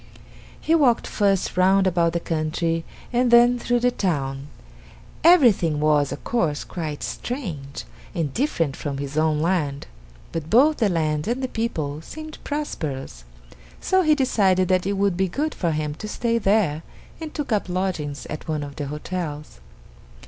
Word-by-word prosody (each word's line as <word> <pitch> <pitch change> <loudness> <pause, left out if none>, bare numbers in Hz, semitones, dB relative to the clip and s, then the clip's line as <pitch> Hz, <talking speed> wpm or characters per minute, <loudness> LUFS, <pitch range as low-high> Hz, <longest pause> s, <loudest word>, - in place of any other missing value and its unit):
He 320 - 0
walked 275 -8 +4
first 195 -2 0
round 190 +2 +4
about 170 -2 +2
the 170 - 0
country 165 +1 -1 0.3
and 245 +1 +3
then 240 +1 +6
through 245 0 0
the 245 0 +3
town. 140 - -2 0.8
Everything 235 - +5
was, 150 -2 +2
of - - -6
course, 165 -11 0
quite 155 -4 -5
strange, 170 - -5 0.3
and 150 -5 -1
different 165 - 0
from 140 -2 -4
his 140 +1 -5
own 155 -1 +2
land. 155 -5 0 0.5
But 160 -1 -4
both 285 - +5
the 220 -4 +2
land 155 -3 0
and 245 +3 -1
the - - 0
people 160 - -3
seemed 310 - -9
prosperous, 140 - -4 0.5
so 375 0 +2
he 310 -3 +4
decided 195 - +2
that 185 0 +2
it 200 - +1
would 200 -2 +1
be 190 +1 +1
good 300 - -2
for 170 - -1
him 155 -1 -2
to 215 - -5
stay 230 +2 0
there 195 -7 +2 0.4
and 320 -2 -6
took 295 -5 -4
up 205 -3 0
lodgings 180 -6 -2
at 155 - -7
one 155 -2 -2
of 140 -1 -9
the 145 -2 -3
hotels. 150 - -5
180 Hz, 165 wpm, -23 LUFS, 150-235 Hz, 0.8 s, then